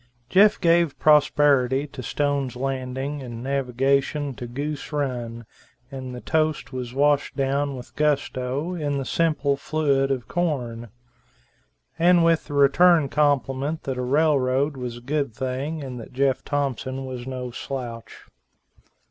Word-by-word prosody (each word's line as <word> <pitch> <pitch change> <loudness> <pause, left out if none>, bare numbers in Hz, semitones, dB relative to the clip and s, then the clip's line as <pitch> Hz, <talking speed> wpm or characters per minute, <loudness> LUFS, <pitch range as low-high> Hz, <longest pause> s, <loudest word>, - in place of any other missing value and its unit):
Jeff 205 +6 +5
gave 170 -3 +3
prosperity 145 -3 +4
to 135 -2 -9
Stone's 140 +1 -1
Landing 135 +2 -3
and 120 -2 -7
navigation 135 +2 0
to 120 0 -7
Goose 145 +5 -5
Run, 120 -5 -3 0.5
and 130 -2 -6
the 125 - -8
toast 155 -3 0
was 125 -2 -4
washed 145 0 +2
down 140 +1 0
with 125 -1 -11
gusto, 145 +1 -1
in 145 -5 -2
the 135 - -3
simple 150 -4 +1
fluid 140 -2 0
of 130 -4 -2
corn; 125 -10 -2 1.1
and 175 0 +5
with 165 -1 +3
the 145 - -6
return 145 +2 +5
compliment 145 +1 0
that 130 -2 -3
a - - 0
rail 145 +3 +3
road 135 +3 0
was 125 -2 -5
a - - -11
good 140 -2 -2
thing, 135 +5 -3
and 125 -2 -6
that 115 - -11
Jeff 135 0 +1
Thompson 135 -2 -2
was 130 -1 -6
no 125 -1 -5
slouch. 120 -3 -7
135 Hz, 140 wpm, -24 LUFS, 130-150 Hz, 1.1 s, Jeff